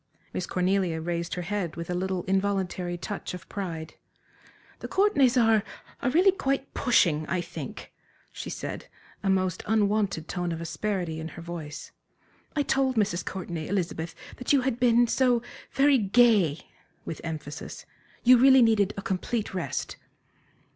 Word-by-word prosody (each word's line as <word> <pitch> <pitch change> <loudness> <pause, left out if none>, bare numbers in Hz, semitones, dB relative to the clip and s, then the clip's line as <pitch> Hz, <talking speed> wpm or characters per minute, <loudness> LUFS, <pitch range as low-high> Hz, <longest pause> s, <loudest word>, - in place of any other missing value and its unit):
Miss 180 - -3
Cornelia 180 -2 +1
raised 170 +1 -3
her 180 - -3
head 180 -3 -3
with 170 0 -5
a 180 - -2
little, 185 0 -1
involuntary 190 -2 -1
touch 195 +1 -5
of 180 0 -11
pride. 165 -5 -5 0.9
"The - - -6
Courtenays 285 - +3
are 225 -3 +5 0.4
are - - +1
really 360 +8 +5
quite 275 -7 -2
pushing, 170 - +2
I 185 - 0
think," 165 -5 -7 0.4
she - - -7
said, - - -6 0.3
a 195 - 0
most 185 -2 +1
unwonted 205 -6 +1
tone 175 -2 -2
of 165 - -3
asperity 170 -1 -3
in 160 - -5
her 170 - -9
voice. 165 -3 -7 0.6
"I 290 - +2
told 265 -1 +1
Mrs. 200 -5 +1
Courtenay, 170 -4 -5
Elizabeth, 165 -4 -2 0.2
that 250 - -2
you 280 -2 +5
had 255 -2 -1
been 240 -1 +5
so 245 -1 +2 0.3
very 275 -1 +4
gay" 205 -7 +4 0.4
with 160 - -6
emphasis 155 -2 -6 0.4
"you 250 0 +7
really 265 0 +7
needed 210 -3 +3
a 200 - -4
complete 205 +4 -2
rest." 180 -2 -3
190 Hz, 150 wpm, -27 LUFS, 170-240 Hz, 0.9 s, you